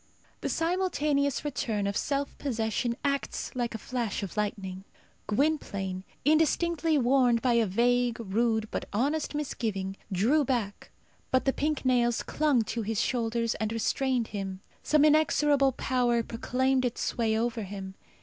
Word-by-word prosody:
The -, -, -3 dB
simultaneous 305 Hz, -6 st, 0 dB
return 225 Hz, -7 st, -1 dB
of 200 Hz, 0 st, -1 dB
self 280 Hz, +4 st, -1 dB
possession 235 Hz, -2 st, -1 dB
acts 280 Hz, -1 st, -2 dB
like 240 Hz, -2 st, -2 dB
a -, -, -2 dB
flash 230 Hz, -3 st, -3 dB
of 195 Hz, -, -6 dB
lightning. 195 Hz, -3 st, -3 dB, 0.4 s
Gwynplaine, 200 Hz, -8 st, -1 dB, 0.2 s
indistinctly 320 Hz, +1 st, +2 dB
warned 250 Hz, -2 st, +3 dB
by 250 Hz, -2 st, +3 dB
a 230 Hz, -2 st, +3 dB
vague, 245 Hz, +4 st, +2 dB
rude, 220 Hz, +1 st, 0 dB
but -, -, -3 dB
honest 290 Hz, +8 st, 0 dB
misgiving, 210 Hz, -10 st, -3 dB, 0.2 s
drew 235 Hz, +12 st, +3 dB
back, 235 Hz, -6 st, -2 dB, 0.4 s
but 260 Hz, -, +2 dB
the 270 Hz, -, +2 dB
pink 300 Hz, -1 st, -1 dB
nails 240 Hz, -2 st, +2 dB
clung 295 Hz, -6 st, +2 dB
to 230 Hz, +2 st, -3 dB
his 220 Hz, 0 st, -2 dB
shoulders 230 Hz, -2 st, 0 dB
and 220 Hz, 0 st, -1 dB
restrained 245 Hz, +1 st, 0 dB
him. 195 Hz, -2 st, -5 dB, 0.2 s
Some 300 Hz, -1 st, +4 dB
inexorable 295 Hz, -3 st, +4 dB
power 245 Hz, -2 st, +1 dB
proclaimed 255 Hz, +3 st, 0 dB
its 245 Hz, -2 st, -2 dB
sway 220 Hz, -2 st, 0 dB
over 230 Hz, 0 st, -1 dB
him. 195 Hz, -1 st, -6 dB
240 Hz, 140 wpm, -28 LUFS, 220-280 Hz, 0.4 s, Some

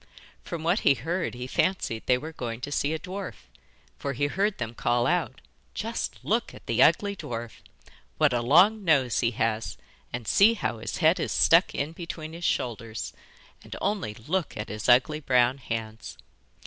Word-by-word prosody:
From 165 Hz, -2 st, -6 dB
what 175 Hz, +6 st, +2 dB
he 140 Hz, -, +4 dB
heard, 165 Hz, +4 st, -3 dB
he 125 Hz, +1 st, -5 dB
fancied 130 Hz, -5 st, -1 dB
they 125 Hz, -, +4 dB
were 155 Hz, +5 st, -7 dB
going 115 Hz, -5 st, -5 dB
to 145 Hz, -, -5 dB
see 145 Hz, +1 st, 0 dB
a 160 Hz, -, -1 dB
dwarf, 185 Hz, +4 st, -7 dB, 0.5 s
for 140 Hz, -, -3 dB
he 145 Hz, +3 st, 0 dB
heard 195 Hz, +7 st, 0 dB
them 115 Hz, -1 st, -4 dB
call 120 Hz, 0 st, +1 dB
out: -, -, 0 dB, 0.3 s
'Just -, -, -3 dB
look -, -, 0 dB
at -, -, -14 dB
the 120 Hz, +1 st, +1 dB
ugly 200 Hz, +7 st, +4 dB
dwarf!' 120 Hz, -, -6 dB, 0.6 s
'What 150 Hz, -4 st, +3 dB
a 120 Hz, -, +1 dB
long 185 Hz, -, +5 dB
nose 140 Hz, -8 st, +3 dB
he 115 Hz, -, +2 dB
has, 110 Hz, -, -2 dB, 0.3 s
and 120 Hz, -3 st, -5 dB
see 220 Hz, +4 st, +5 dB
how 115 Hz, -, -3 dB
his -, -, -4 dB
head -, -, +5 dB
is -, -, -2 dB
stuck -, -, +4 dB
in 145 Hz, +3 st, -2 dB
between 165 Hz, -2 st, -7 dB
his 170 Hz, +1 st, -8 dB
shoulders, 115 Hz, -2 st, -2 dB, 0.5 s
and -, -, -9 dB
only 195 Hz, -, -2 dB
look 160 Hz, -, -3 dB
at 105 Hz, -, -5 dB
his 105 Hz, +2 st, -3 dB
ugly 130 Hz, +5 st, +4 dB
brown 125 Hz, -2 st, +2 dB
hands! 110 Hz, -, -5 dB
135 Hz, 180 wpm, -27 LUFS, 115-170 Hz, 0.6 s, long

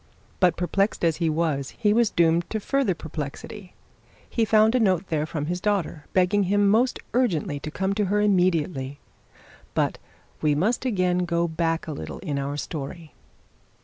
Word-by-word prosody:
But, 180 Hz, -3 st, +3 dB
perplexed 195 Hz, +2 st, 0 dB
as 165 Hz, -2 st, +2 dB
he 165 Hz, -2 st, +1 dB
was, 155 Hz, -4 st, -1 dB
he 210 Hz, -2 st, +3 dB
was 230 Hz, -1 st, +3 dB
doomed 170 Hz, -1 st, +2 dB
to 220 Hz, -, -2 dB
further 250 Hz, -3 st, 0 dB
perplexity. 160 Hz, +6 st, -7 dB, 0.5 s
He 230 Hz, -, 0 dB
found 215 Hz, +1 st, +4 dB
a 255 Hz, -, +3 dB
note 190 Hz, -4 st, +1 dB
there 155 Hz, -1 st, 0 dB
from 150 Hz, -2 st, -3 dB
his 175 Hz, +3 st, -3 dB
daughter, 190 Hz, -8 st, -1 dB
begging 190 Hz, +2 st, +3 dB
him 205 Hz, +2 st, +2 dB
to 200 Hz, -, +4 dB
most 245 Hz, +4 st, +3 dB, 0.2 s
urgently 170 Hz, -, 0 dB
to 155 Hz, -, -6 dB
come 190 Hz, +5 st, -1 dB
to 210 Hz, 0 st, 0 dB
her 205 Hz, +2 st, +1 dB
immediately. 175 Hz, -8 st, +1 dB, 0.8 s
But -, -, 0 dB, 0.4 s
we 150 Hz, -2 st, +2 dB
must 215 Hz, -, 0 dB
again 185 Hz, -6 st, +1 dB
go 170 Hz, 0 st, 0 dB
back 165 Hz, 0 st, -1 dB
a 160 Hz, -, -5 dB
little 80 Hz, -, -6 dB
in 145 Hz, -2 st, -3 dB
our 140 Hz, +1 st, -3 dB
story. 155 Hz, +2 st, -6 dB
175 Hz, 175 wpm, -25 LUFS, 155-205 Hz, 0.8 s, found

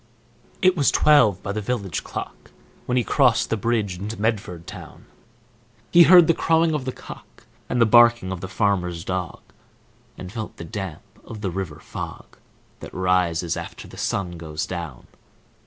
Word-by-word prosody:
It 185 Hz, 0 st, +5 dB
was 145 Hz, -5 st, +3 dB
twelve 125 Hz, -12 st, +4 dB
by 100 Hz, -, -3 dB
the 105 Hz, +1 st, -3 dB
village 100 Hz, -7 st, -3 dB
clock -, -, -8 dB, 0.4 s
When 125 Hz, -, 0 dB
he 125 Hz, -, +2 dB
crossed 125 Hz, -4 st, +2 dB
the -, -, +3 dB
bridge 105 Hz, -4 st, -1 dB
into 105 Hz, +3 st, -6 dB
Medford 105 Hz, -6 st, -2 dB
town. -, -, -11 dB, 0.9 s
He 175 Hz, -, +7 dB
heard 175 Hz, 0 st, +8 dB
the 165 Hz, -, +3 dB
crowing 165 Hz, 0 st, +2 dB
of 145 Hz, -4 st, -2 dB
the 130 Hz, -, -2 dB
cock, -, -, -13 dB, 0.3 s
And 125 Hz, -, 0 dB
the 115 Hz, -, +6 dB
barking 120 Hz, -3 st, +5 dB
of 95 Hz, -2 st, -5 dB
the 95 Hz, -, -5 dB
farmer's 90 Hz, -3 st, -1 dB
dog, 90 Hz, -2 st, -4 dB, 0.8 s
And 90 Hz, 0 st, -8 dB
felt 110 Hz, -1 st, -7 dB
the -, -, -7 dB
damp 95 Hz, -4 st, -6 dB, 0.2 s
of 110 Hz, -2 st, -9 dB
the 95 Hz, -4 st, -2 dB
river 85 Hz, -5 st, -5 dB
fog, -, -, -9 dB, 0.4 s
That -, -, -9 dB
rises 90 Hz, -3 st, +1 dB
after -, -, -8 dB
the -, -, -13 dB
sun 90 Hz, -3 st, -3 dB
goes 80 Hz, -1 st, -4 dB
down. 85 Hz, -8 st, -7 dB
100 Hz, 170 wpm, -23 LUFS, 90-120 Hz, 0.9 s, heard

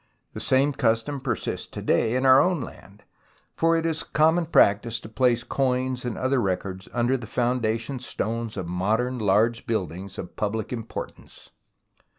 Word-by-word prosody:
The -, -, -6 dB
same 135 Hz, +2 st, +2 dB
custom 130 Hz, +2 st, 0 dB
persists 130 Hz, -2 st, -3 dB
to -, -, -8 dB
this -, -, -8 dB
day 115 Hz, +2 st, +2 dB
in 130 Hz, +1 st, +1 dB
our 130 Hz, 0 st, +8 dB
own 180 Hz, -2 st, +1 dB
land, -, -, -10 dB, 0.5 s
for 165 Hz, 0 st, +3 dB
it 165 Hz, -, -1 dB
is 160 Hz, -1 st, -1 dB
a -, -, -8 dB
common 160 Hz, +2 st, +2 dB
practice 115 Hz, -5 st, +3 dB
to -, -, -10 dB
place 120 Hz, 0 st, +2 dB
coins 130 Hz, -1 st, -1 dB
and 120 Hz, -, -3 dB
other 130 Hz, 0 st, +1 dB
records 95 Hz, -1 st, -3 dB
under 120 Hz, +2 st, +1 dB
the 120 Hz, -3 st, -9 dB
founda 120 Hz, -1 st, 0 dB
tion 130 Hz, +3 st, -5 dB
stones 115 Hz, -2 st, -4 dB
of 95 Hz, -, -3 dB
modern 110 Hz, +8 st, 0 dB
large 110 Hz, +4 st, +2 dB
buildings 95 Hz, -4 st, -3 dB
of 90 Hz, -, -7 dB
public 110 Hz, +2 st, -2 dB
importance. 115 Hz, -2 st, -8 dB
120 Hz, 170 wpm, -25 LUFS, 110-130 Hz, 0.5 s, our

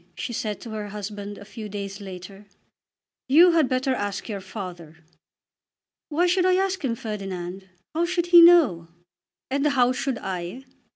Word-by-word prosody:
she 240 Hz, -, -5 dB
said 215 Hz, -2 st, -3 dB
to 230 Hz, -, -9 dB
her 210 Hz, -1 st, -5 dB
husband 205 Hz, 0 st, -7 dB
a 205 Hz, -, -11 dB
few 215 Hz, +1 st, -8 dB
days 200 Hz, 0 st, -6 dB
later. 195 Hz, +1 st, -10 dB, 0.8 s
"You 335 Hz, +7 st, +7 dB
had 320 Hz, -5 st, +3 dB
better 260 Hz, +1 st, 0 dB
ask 205 Hz, -5 st, -3 dB
your 205 Hz, -4 st, -5 dB
father." 175 Hz, -6 st, -8 dB, 1.1 s
"Why 325 Hz, +4 st, +2 dB
should 360 Hz, +1 st, +2 dB
I 365 Hz, -, +4 dB
ask 380 Hz, -1 st, 0 dB
him, 240 Hz, -4 st, 0 dB
Ferdinand? 195 Hz, -4 st, -6 dB, 0.2 s
How 330 Hz, +2 st, +1 dB
should 345 Hz, 0 st, -1 dB
he 345 Hz, -, +11 dB
know?" 310 Hz, -, +6 dB, 0.6 s
"And 280 Hz, +2 st, +1 dB
how 255 Hz, -4 st, +3 dB
should 265 Hz, -1 st, -2 dB
I?" 185 Hz, +7 st, -6 dB
215 Hz, 160 wpm, -24 LUFS, 195-285 Hz, 1.1 s, he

